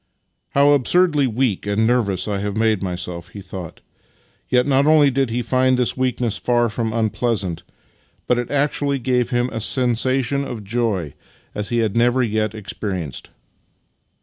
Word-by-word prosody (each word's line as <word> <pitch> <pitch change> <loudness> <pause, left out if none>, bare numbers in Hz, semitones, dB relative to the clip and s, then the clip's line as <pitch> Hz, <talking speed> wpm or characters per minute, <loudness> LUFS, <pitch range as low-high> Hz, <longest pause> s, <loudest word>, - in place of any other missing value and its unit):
" - - -51
How 140 +1 +5
absurdly 145 +1 +3
weak 115 -4 -1
and 105 +2 +1
nervous 110 -6 +1
I 100 -2 -1
have 100 +1 -3
made 110 -3 +2
myself," 90 -2 -4
he 100 - -11
thought. 95 -3 -8 0.7
Yet 125 -1 +3
not 140 0 +3
only 150 -3 +5
did 135 -1 0
he 120 +2 -2
find 130 +2 +2
this 125 -1 +1
weakness 125 -3 -1
far 120 -1 +1
from 110 +1 -2
unpleasant, 110 -5 -1 0.6
but 125 - +1
it 120 - -4
actually 145 0 0
gave 125 -1 0
him 120 -1 +1
a 115 - -3
sensation 130 +3 +1
of 115 -6 -6
joy 105 -6 -1
such - - -21 0.4
as 105 0 -4
he 120 - 0
had 105 - -3
never 120 +2 +3
yd 110 -1 -1
experienced. 95 - -5
120 Hz, 165 wpm, -20 LUFS, 105-130 Hz, 0.7 s, How